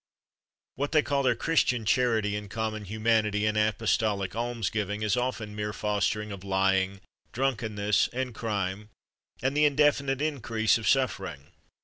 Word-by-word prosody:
What 145 Hz, +3 st, -2 dB
they 155 Hz, -2 st, +5 dB
call 140 Hz, -1 st, 0 dB
their 130 Hz, -, +2 dB
Christian 125 Hz, -8 st, +1 dB
charity 110 Hz, -3 st, +2 dB
and 105 Hz, -1 st, -6 dB
common 110 Hz, -1 st, -3 dB
humanity 110 Hz, 0 st, +1 dB
and 105 Hz, 0 st, +1 dB
apostolic 105 Hz, -2 st, 0 dB
alms 115 Hz, -4 st, -2 dB
giving 105 Hz, 0 st, -2 dB
is 105 Hz, +1 st, +2 dB
often 125 Hz, -4 st, -3 dB
mere 105 Hz, 0 st, -3 dB
fostering 105 Hz, 0 st, -1 dB
of 95 Hz, -2 st, -8 dB
lying, 95 Hz, 0 st, +1 dB, 0.3 s
drunkenness, 110 Hz, -5 st, +1 dB
and 125 Hz, 0 st, -3 dB
crime, 105 Hz, -2 st, -3 dB, 0.5 s
and 135 Hz, +2 st, +1 dB
the 150 Hz, 0 st, +4 dB
indefinite 140 Hz, -2 st, +2 dB
increase 120 Hz, -7 st, +1 dB
of 110 Hz, -, -4 dB
suffering. 95 Hz, -, -1 dB
110 Hz, 140 wpm, -28 LUFS, 105-125 Hz, 0.5 s, they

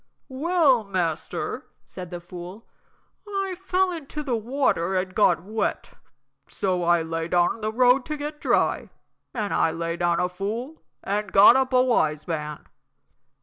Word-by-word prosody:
"Well, 280 Hz, -3 st, +2 dB
master," 180 Hz, -5 st, -3 dB, 0.2 s
said 180 Hz, -2 st, -9 dB
the 175 Hz, -1 st, -6 dB
fool, 180 Hz, +4 st, -10 dB, 0.6 s
"I 390 Hz, -2 st, -2 dB
fell 375 Hz, 0 st, 0 dB
into 300 Hz, -3 st, -6 dB
the 260 Hz, -5 st, -1 dB
water 225 Hz, -6 st, 0 dB
and 185 Hz, 0 st, -1 dB
got 175 Hz, -5 st, +3 dB
wet, 215 Hz, +3 st, -3 dB, 0.6 s
so 185 Hz, -2 st, -1 dB
I 175 Hz, -1 st, +3 dB
lay 165 Hz, 0 st, -3 dB
down 175 Hz, 0 st, +2 dB
in -, -, -15 dB
the 215 Hz, 0 st, -1 dB
road 250 Hz, +3 st, +4 dB
to 305 Hz, -1 st, -3 dB
get 295 Hz, +1 st, -6 dB
dry; -, -, +1 dB, 0.5 s
and 210 Hz, -4 st, -2 dB
I -, -, +3 dB
lay 165 Hz, +1 st, -3 dB
down 175 Hz, -1 st, +1 dB
a 180 Hz, -, +1 dB
fool 215 Hz, -, -5 dB, 0.2 s
an' 205 Hz, +1 st, -2 dB
got 195 Hz, +4 st, +7 dB
up 265 Hz, 0 st, +1 dB
a 255 Hz, 0 st, +4 dB
wise 155 Hz, -, +1 dB
man." 150 Hz, -3 st, -4 dB
205 Hz, 155 wpm, -24 LUFS, 175-265 Hz, 0.6 s, got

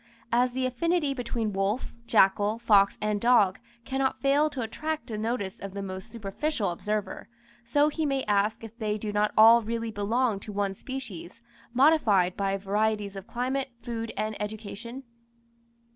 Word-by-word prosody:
As 245 Hz, +1 st, +2 dB
the 260 Hz, 0 st, -1 dB
affinity 295 Hz, +3 st, 0 dB
between 235 Hz, -4 st, -3 dB
wolf, 195 Hz, +5 st, -1 dB
jackal, 205 Hz, 0 st, +3 dB
fox, 205 Hz, -4 st, +4 dB
and 210 Hz, -1 st, 0 dB
dog, 225 Hz, -6 st, +4 dB, 0.3 s
cannot 265 Hz, 0 st, -1 dB
fail 285 Hz, +2 st, +3 dB
to 265 Hz, -5 st, -4 dB
attract 310 Hz, +7 st, -4 dB
the 225 Hz, -, -6 dB
notice 215 Hz, -3 st, -3 dB
of 195 Hz, 0 st, -7 dB
the 200 Hz, -, -4 dB
most 190 Hz, -1 st, -7 dB
superficial 215 Hz, -, -2 dB
observer; 210 Hz, +2 st, -4 dB, 0.4 s
so 290 Hz, +5 st, +3 dB
he 315 Hz, +1 st, -2 dB
may 275 Hz, -1 st, 0 dB
ask 210 Hz, +2 st, +1 dB
if 225 Hz, 0 st, -9 dB
they 215 Hz, -3 st, -2 dB
do 215 Hz, 0 st, -4 dB
not 210 Hz, 0 st, +2 dB
all 225 Hz, +2 st, +8 dB
really 230 Hz, 0 st, -3 dB
belong 220 Hz, +1 st, 0 dB
to 210 Hz, -, -8 dB
one 200 Hz, -1 st, -1 dB
species, 230 Hz, -4 st, -8 dB, 0.3 s
modified 235 Hz, -, +4 dB
by 195 Hz, 0 st, 0 dB
varieties 205 Hz, +1 st, -1 dB
of 195 Hz, 0 st, -8 dB
climate, 260 Hz, +2 st, -2 dB
food, 230 Hz, -2 st, -4 dB
and 215 Hz, 0 st, -2 dB
education? 220 Hz, +4 st, -6 dB
220 Hz, 160 wpm, -27 LUFS, 200-255 Hz, 0.4 s, all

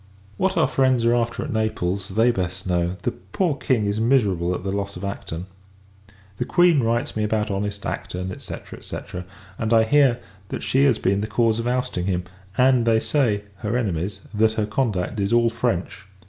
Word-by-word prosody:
What 190 Hz, -1 st, +1 dB
our 165 Hz, -, +4 dB
friends 130 Hz, -3 st, +2 dB
are 120 Hz, -, +4 dB
after 120 Hz, -1 st, 0 dB
at 145 Hz, -, -4 dB
Naples, 100 Hz, -3 st, -1 dB
they 115 Hz, +2 st, +5 dB
best 90 Hz, -3 st, -3 dB
know. 90 Hz, 0 st, 0 dB
The -, -, +1 dB
poor 145 Hz, -, -2 dB
King 130 Hz, -7 st, +1 dB
is 100 Hz, +1 st, 0 dB
miserable 100 Hz, -8 st, +2 dB
at -, -, -6 dB
the 95 Hz, -, -2 dB
loss 100 Hz, -1 st, -3 dB
of 90 Hz, -, -8 dB
Acton. 90 Hz, -3 st, -5 dB, 0.9 s
The -, -, 0 dB
Queen 175 Hz, -5 st, +4 dB
writes 115 Hz, +1 st, 0 dB
me 110 Hz, -, 0 dB
about 105 Hz, 0 st, 0 dB
honest 100 Hz, +1 st, -3 dB
Acton, 90 Hz, +1 st, -4 dB
&c. -, -, -6 dB, 0.3 s
&c. -, -, -6 dB, 0.6 s
and 110 Hz, -1 st, -1 dB
I 115 Hz, -1 st, +6 dB
hear, 135 Hz, 0 st, +4 dB, 0.3 s
that -, -, -4 dB
she 135 Hz, +2 st, +3 dB
has 130 Hz, -5 st, +4 dB
been 100 Hz, +1 st, +1 dB
the 105 Hz, -, -2 dB
cause 115 Hz, 0 st, +2 dB
of 115 Hz, -, -2 dB
ousting 125 Hz, -8 st, -1 dB
him: 90 Hz, -2 st, 0 dB, 0.3 s
and 125 Hz, -2 st, +4 dB
they 110 Hz, -1 st, +4 dB
say 110 Hz, -7 st, +1 dB
her 105 Hz, +4 st, -1 dB
enemies 100 Hz, -3 st, -2 dB
that 110 Hz, +1 st, +3 dB
her 110 Hz, -1 st, 0 dB
conduct 105 Hz, -4 st, -1 dB
is 100 Hz, 0 st, 0 dB
all 120 Hz, -1 st, +4 dB
French. 105 Hz, -5 st, -2 dB
110 Hz, 190 wpm, -23 LUFS, 95-120 Hz, 0.9 s, I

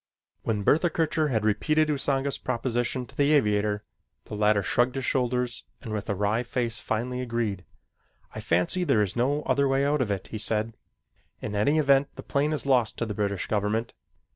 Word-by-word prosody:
When 105 Hz, -3 st, -1 dB
Bertha 165 Hz, -, +3 dB
Kircher 160 Hz, -1 st, 0 dB
had 110 Hz, -6 st, 0 dB
repeated 155 Hz, +9 st, +2 dB
Usanga's 140 Hz, -1 st, 0 dB
proposition 120 Hz, 0 st, -1 dB
to -, -, -17 dB
the 145 Hz, +1 st, +3 dB
aviator, 105 Hz, -5 st, +2 dB, 0.4 s
the -, -, -11 dB
latter 105 Hz, -1 st, +2 dB
shrugged 125 Hz, +1 st, +1 dB
his 135 Hz, -2 st, -2 dB
shoulders 125 Hz, -1 st, -1 dB
and 115 Hz, -5 st, -7 dB
with 105 Hz, -1 st, -4 dB
a 100 Hz, -, 0 dB
wry 105 Hz, +4 st, +1 dB
face 120 Hz, -2 st, -2 dB
finally 125 Hz, +3 st, -2 dB
agreed. 115 Hz, -6 st, -2 dB, 0.7 s
"I -, -, -6 dB
fancy 90 Hz, -, +1 dB
there 110 Hz, -11 st, +3 dB
is 95 Hz, -, -4 dB
no 140 Hz, +5 st, +1 dB
other 140 Hz, 0 st, +2 dB
way 135 Hz, +1 st, +2 dB
out 145 Hz, 0 st, +1 dB
of 120 Hz, -, 0 dB
it," 100 Hz, -2 st, -3 dB
he 110 Hz, -, -5 dB
said. 110 Hz, +1 st, 0 dB, 0.6 s
"In 105 Hz, -, -5 dB
any 105 Hz, +10 st, +2 dB
event 140 Hz, -2 st, +4 dB
the -, -, -8 dB
plane 145 Hz, +2 st, 0 dB
is 150 Hz, -, -2 dB
lost 125 Hz, -5 st, +2 dB
to 115 Hz, -, -1 dB
the 105 Hz, -, -4 dB
British 100 Hz, -2 st, -1 dB
government. 105 Hz, +2 st, -1 dB
120 Hz, 190 wpm, -26 LUFS, 105-140 Hz, 0.7 s, event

